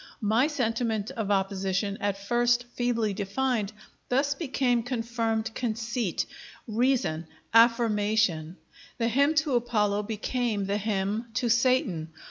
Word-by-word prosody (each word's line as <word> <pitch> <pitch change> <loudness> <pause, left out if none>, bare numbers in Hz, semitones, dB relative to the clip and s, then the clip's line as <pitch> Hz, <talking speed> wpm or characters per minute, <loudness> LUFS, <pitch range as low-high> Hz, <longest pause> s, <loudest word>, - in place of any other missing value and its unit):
My 225 +7 +3
sentiment 230 -5 -1
of 225 -6 -3
opposition, 195 0 0
at 200 -1 0
first 240 +4 +2
feebly 230 -4 0
defined, 210 +2 -1 0.4
thus 280 +3 +2
became 260 -5 0
confirmed 225 -2 -2
conceit, 230 -3 -2 0.4
reason, 225 -8 0 0.3
affirmation; 215 -7 +3 0.4
the 230 -3 +1
hymn 280 +6 +3
to 305 -2 +2
Apollo 215 -4 +1
became 220 0 -2
the 200 +1 0
hymn 210 +2 -1
to 250 -1 0
Satan. 230 -10 +2
225 Hz, 110 wpm, -27 LUFS, 205-245 Hz, 0.4 s, My